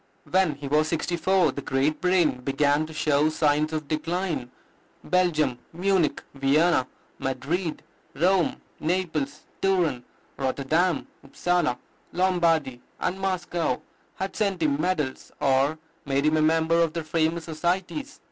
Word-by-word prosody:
When 185 -5 +2
he 140 0 -7
was 150 +2 +2
sixty 170 +2 -1
four 185 +2 +3
the 140 - -6
great 140 +3 0
brain 175 -8 +3
began 145 +3 +1
to - - -10
show 155 -1 +2
signs 155 0 +1
of 155 -2 -3
decline. 160 -3 -2 0.5
Belgium, 155 -9 +1
Munich, 180 -2 +1
Vienna, 140 +1 +3 0.3
Madrid, 160 +6 -2 0.3
Rome, 180 +4 +2 0.2
Naples, 155 -4 -1 0.2
Turin, 175 -10 +1 0.3
Rotterdam, 140 +6 +1 0.2
Upsala, 175 -2 0 0.4
Lombardy, 165 -8 +1 0.2
and 190 - -1
Moscow 175 -7 -1 0.4
had 190 +1 -4
sent 195 -5 0
him 145 -1 +1
medals, 155 -7 -2
or 140 +3 +2 0.3
made 140 +1 +1
him 155 +1 +3
a - - +3
member 160 +1 +3
of 165 -2 +1
their 165 - -3
famous 160 +1 0
societies. 180 - -2
160 Hz, 130 wpm, -26 LUFS, 145-180 Hz, 0.5 s, four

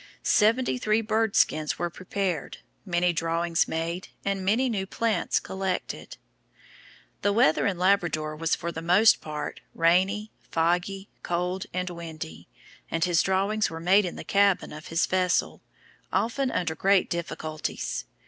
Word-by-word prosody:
Seventy 240 +4 +3
three 215 -1 +2
bird 220 -1 0
skins 155 -1 +2
were 175 0 -2
prepared, 185 -3 -3 0.3
many 175 0 +2
drawings 165 0 +1
made, 165 +3 -3 0.2
and 195 -1 -1
many 225 +7 +2
new 200 -5 -2
plants 230 +2 0
collected. 190 -1 -4 1.0
The 205 - +2
weather 200 -7 +3
in 195 -3 -1
Labrador 175 -5 +1
was 165 +1 0
for 170 - -4
the 165 - -6
most 180 +7 +5
part 150 -1 -5
rainy, 190 +6 +2 0.2
foggy, 175 +4 0
cold, 180 +2 -2
and 180 0 -2
windy, 155 - -8 0.4
and 165 +1 +1
his 175 -2 +3
drawings 195 +3 +1
were 165 - -6
made 190 +4 +4
in 175 - -4
the - - -7
cabin 200 -4 +2
of 155 +1 -9
his 165 0 +1
vessel, 185 0 0 0.5
often 255 +4 0
under 170 -8 -1
great 195 +4 +3
difficulties. 155 -2 -4
180 Hz, 140 wpm, -26 LUFS, 165-200 Hz, 1.0 s, most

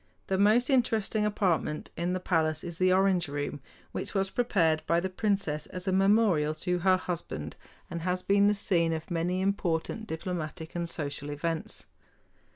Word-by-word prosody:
The 190 - 0
most 225 +6 +4
interesting 220 -4 +2
apartment 180 -7 0
in 175 +2 -1
the 185 - -1
palace 160 -4 0
is 170 -2 -7
the 185 0 +4
Orange 185 -2 +3
Room, 145 0 -3 0.3
which - - -5
was 195 0 +1
prepared 165 -10 +2
by 170 - +3
the 185 +2 -3
princess 190 -7 -1
as 180 +1 -6
a - - +2
memorial 190 -6 +3
to 180 +3 -1
her 185 +1 +4
husband, 160 - -5 0.3
and 170 0 -5
has 180 +1 -1
been 200 0 +4
the 210 - +3
scene 170 -5 +1
of 160 +3 -5
many 175 +2 0
important 195 +2 -1
diplomatic 160 -1 -5
and 170 -1 -2
social 145 -2 -4
events. 160 +2 -3
180 Hz, 165 wpm, -29 LUFS, 160-195 Hz, 0.3 s, most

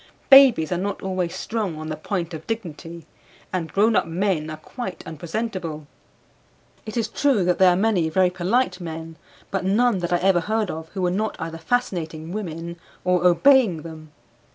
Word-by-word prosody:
Babies 265 - +7
are 175 - 0
not 200 +1 -3
always 185 -2 -2
strong 205 -3 -3
on 155 0 -6
the 155 - -3
point 170 +1 -4
of 160 0 -8
dignity, 170 -6 -6 0.5
and 170 -3 -2
grown 215 +3 +3
up - - +2
men 170 -2 -1
are 155 - -6
quite 190 +4 -7
unpresentable. 165 -1 -4 1.0
It 215 - -5
is 225 -2 0
true 255 -3 +1
that 180 0 +1
there 190 -1 +7
are 175 - +3
many 190 -5 +1
very 180 +2 +3
polite 185 +1 0
men, 165 -1 -7 0.3
but 195 -1 -1
none 210 +2 +2
that 175 0 -3
I 175 - +4
ever 185 0 +3
heard 215 +2 -1
of 160 0 -7
who 190 - -2
were 180 - +2
not 215 +3 -1
either 165 0 -5
fascinating 165 -6 -2
women 170 -4 -5 0.3
or 180 -1 +3
obeying 200 - +4
them. 155 -2 -10
180 Hz, 175 wpm, -23 LUFS, 165-210 Hz, 1.0 s, Babies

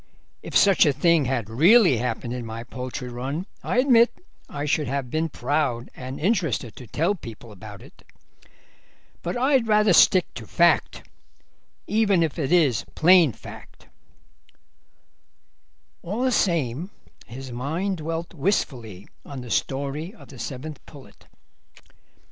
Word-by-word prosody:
If - - 0
such 195 -4 +5
a 145 - +3
thing 160 +1 +3
had 125 -4 -2
really 170 - +5
happened 120 0 -3
in 125 -1 -5
my 115 0 -7
poultry 125 +1 -6
run 130 +8 -4 0.2
I - - -2
admit 250 -2 +5 0.4
I 145 0 -4
should 150 0 0
have 135 -1 -3
been 160 +1 -1
proud 130 -3 -2
and 130 +1 -7
interested 165 - -1
to 125 - -11
tell 165 - 0
people 115 - -11
about 105 +1 -11
it. 135 - -18 1.2
But - - -3
I'd 260 -2 +2
rather 210 -2 +4
stick 180 +1 +5
to 115 -4 -9
fact, 170 -2 +1 0.8
even 205 -4 +2
if 160 0 -3
it 145 0 -2
is 150 - +3
plain 175 -3 +6
fact." - - -13 2.1
All 210 +8 -3
the 260 - +2
same 165 - 0 0.4
his 130 +2 -9
mind 160 +11 -3
dwelt 165 +1 -5
wistfully 125 - -2 0.2
on 140 -2 -8
the 120 -2 -9
story 140 - -2
of - - -16
the - - -12
Seventh 145 +2 -7
Pullet. 140 -3 -16
145 Hz, 135 wpm, -24 LUFS, 125-180 Hz, 2.1 s, plain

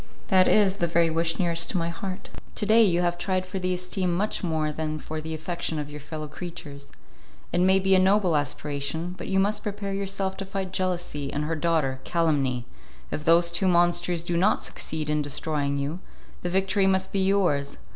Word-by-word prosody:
"That 185 -1 +5
is 200 -2 +4
the 170 - +1
very 170 0 +2
wish 165 +1 +1
nearest 170 -2 +1
to - - 0
my 170 -1 0
heart." 185 +2 -6 0.2
"To 210 - -1
day 220 +2 +6
you 175 -4 +3
have 175 0 0
tried 185 0 0
for 185 +1 -4
the 185 0 -1
esteem 180 0 -1
much 200 +4 -1
more 160 -3 0
than 155 0 -3
for 155 +1 -5
the 160 +1 -4
affection 165 0 -3
of 150 -1 -4
your 150 - -7
fellow 155 +1 -6
creatures. 145 -3 -8 0.6
It 175 - +2
may 190 +1 +5
be 190 0 +2
a 190 - +6
noble 190 -2 +3
aspiration, 145 +3 -2
but - - -7
you 190 0 +2
must 205 +2 +1
prepare 200 -1 -4
yourself 195 -1 -2
to 195 - -4
fight 190 -1 -4
jealousy 175 -7 -2
and 150 - -2
her 165 +1 -1
daughter, 155 -5 0
calumny; 140 -7 +1 0.5
if 150 - -3
those 170 +1 +5
two 190 +3 +1
monsters 175 -1 +2
do 175 0 -2
not 190 +5 +2
succeed 155 -1 -4
in 150 0 +1
destroying 145 0 -2
you, 145 +5 -3 0.4
the 175 - -2
victory 190 +2 +2
must 190 0 +1
be 195 - +1
yours. 180 -8 +1
175 Hz, 200 wpm, -26 LUFS, 155-190 Hz, 0.6 s, day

